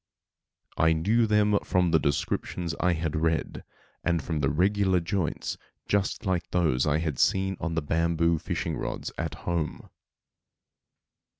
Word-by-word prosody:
I 80 Hz, 0 st, +4 dB
knew 110 Hz, +9 st, +2 dB
them 105 Hz, -1 st, +3 dB
from 90 Hz, -2 st, +1 dB
the 80 Hz, -, +5 dB
descriptions 80 Hz, +4 st, -1 dB
I 90 Hz, -1 st, +3 dB
had 80 Hz, -1 st, -2 dB
read, 80 Hz, 0 st, -1 dB, 0.4 s
and 85 Hz, -1 st, +1 dB
from 80 Hz, +1 st, -3 dB
the 70 Hz, -2 st, +2 dB
regular 95 Hz, +4 st, +2 dB
joints, 85 Hz, -1 st, -2 dB, 0.3 s
just 100 Hz, +2 st, 0 dB
like 90 Hz, -3 st, -1 dB
those 80 Hz, -7 st, +1 dB
I 75 Hz, 0 st, +3 dB
had 80 Hz, -4 st, -2 dB
seen 95 Hz, 0 st, +2 dB
on 85 Hz, -1 st, -2 dB
the 80 Hz, -, 0 dB
bamboo 85 Hz, +1 st, +1 dB
fishing -, -, -3 dB
rods -, -, -4 dB
at -, -, -3 dB
home. 85 Hz, -3 st, -3 dB
85 Hz, 140 wpm, -27 LUFS, 80-95 Hz, 0.4 s, the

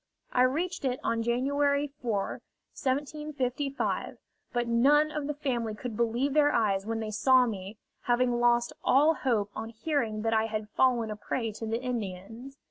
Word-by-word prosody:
I 250 Hz, -, +3 dB
reached 320 Hz, +8 st, +1 dB
it 255 Hz, -2 st, 0 dB
on 230 Hz, 0 st, 0 dB
January 280 Hz, +4 st, +1 dB
4,1755; 275 Hz, +5 st, -3 dB, 0.3 s
but 240 Hz, -1 st, -1 dB
none 285 Hz, +6 st, +4 dB
of 295 Hz, -2 st, -3 dB
the 295 Hz, -, -2 dB
family 240 Hz, -7 st, -2 dB
could 230 Hz, 0 st, -6 dB
believe 235 Hz, +5 st, 0 dB
their 295 Hz, -1 st, +4 dB
eyes 205 Hz, -5 st, +1 dB
when 225 Hz, 0 st, -2 dB
they 215 Hz, -1 st, -4 dB
saw 255 Hz, +4 st, +4 dB
me, 205 Hz, -2 st, -5 dB, 0.3 s
having 245 Hz, 0 st, +2 dB
lost 240 Hz, 0 st, +3 dB
all 295 Hz, +5 st, +5 dB
hope 225 Hz, -9 st, 0 dB
on 225 Hz, +1 st, -5 dB
hearing 230 Hz, -3 st, -2 dB
that 225 Hz, 0 st, +1 dB
I 220 Hz, 0 st, +2 dB
had 215 Hz, -1 st, -4 dB
fallen 235 Hz, -2 st, +2 dB
a -, -, -3 dB
prey 225 Hz, +2 st, -3 dB
to 225 Hz, +1 st, -6 dB
the 225 Hz, +1 st, -1 dB
Indians. 225 Hz, +2 st, -5 dB
240 Hz, 160 wpm, -29 LUFS, 225-275 Hz, 0.3 s, all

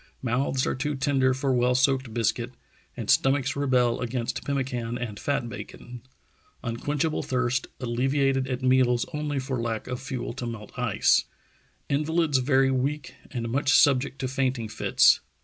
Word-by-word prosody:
Mouths 130 Hz, +2 st, 0 dB
are -, -, 0 dB
too 150 Hz, +3 st, -2 dB
tender 135 Hz, -1 st, +2 dB
for 130 Hz, +1 st, 0 dB
well 125 Hz, 0 st, +2 dB
soaked 130 Hz, -1 st, +2 dB
biscuit, 115 Hz, -1 st, -1 dB, 0.4 s
and -, -, -5 dB
stomachs 135 Hz, 0 st, +2 dB
rebel 125 Hz, -4 st, +2 dB
against 120 Hz, 0 st, -3 dB
pemmican 125 Hz, -4 st, -2 dB
and 110 Hz, -5 st, -5 dB
fat 140 Hz, -4 st, -1 dB
bacon.... 120 Hz, +1 st, -9 dB, 0.6 s
Unquenchable 145 Hz, +7 st, -1 dB
thirst, 125 Hz, 0 st, -1 dB
alleviated 135 Hz, +2 st, +1 dB
at 130 Hz, -1 st, -3 dB
meals 130 Hz, -2 st, +3 dB
only 150 Hz, -1 st, -2 dB
for 130 Hz, -2 st, -2 dB
lack 115 Hz, -2 st, -3 dB
of 125 Hz, 0 st, -5 dB
fuel 130 Hz, -3 st, -4 dB
to 125 Hz, -1 st, -5 dB
melt 110 Hz, -3 st, -7 dB
ice.... -, -, +2 dB, 0.6 s
Invalids 155 Hz, 0 st, +1 dB
very 135 Hz, 0 st, +3 dB
weak 140 Hz, +3 st, -2 dB, 0.2 s
and 120 Hz, -2 st, -4 dB
much 135 Hz, +3 st, +1 dB
subject 135 Hz, -1 st, +4 dB
to 130 Hz, -, -2 dB
fainting 130 Hz, -3 st, -1 dB
fits. 105 Hz, -, +4 dB
130 Hz, 150 wpm, -26 LUFS, 120-135 Hz, 0.6 s, subject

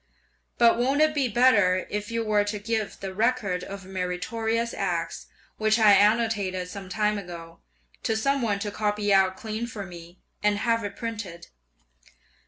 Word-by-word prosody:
But 235 Hz, 0 st, +5 dB
won't 270 Hz, +4 st, +2 dB
it 310 Hz, 0 st, +4 dB
be 280 Hz, -4 st, +1 dB
better 205 Hz, -6 st, +4 dB
if 210 Hz, +1 st, -3 dB
you 230 Hz, 0 st, -1 dB
were 210 Hz, -1 st, +3 dB
to 210 Hz, +1 st, -3 dB
give 220 Hz, 0 st, -3 dB
the 195 Hz, -1 st, -5 dB
"Record 210 Hz, -4 st, 0 dB
of 195 Hz, 0 st, -8 dB
Meritorious 220 Hz, +5 st, -2 dB
Acts," -, -, -3 dB, 0.3 s
which 215 Hz, 0 st, +2 dB
I 215 Hz, -2 st, +6 dB
annotated 205 Hz, -3 st, +2 dB
some 195 Hz, 0 st, -8 dB
time 210 Hz, +1 st, 0 dB
ago, 170 Hz, -3 st, -10 dB, 0.4 s
to 225 Hz, -, 0 dB
some 275 Hz, +4 st, +1 dB
one 210 Hz, -4 st, 0 dB
to 205 Hz, -, -3 dB
copy 210 Hz, -1 st, 0 dB
out 190 Hz, -1 st, +3 dB
clean 220 Hz, +2 st, -4 dB
for 210 Hz, -4 st, -6 dB
me, 175 Hz, 0 st, -12 dB, 0.2 s
and 210 Hz, 0 st, +2 dB
have 230 Hz, +1 st, +1 dB
it 205 Hz, 0 st, -5 dB
printed? 210 Hz, -7 st, -6 dB
210 Hz, 165 wpm, -26 LUFS, 190-230 Hz, 0.4 s, I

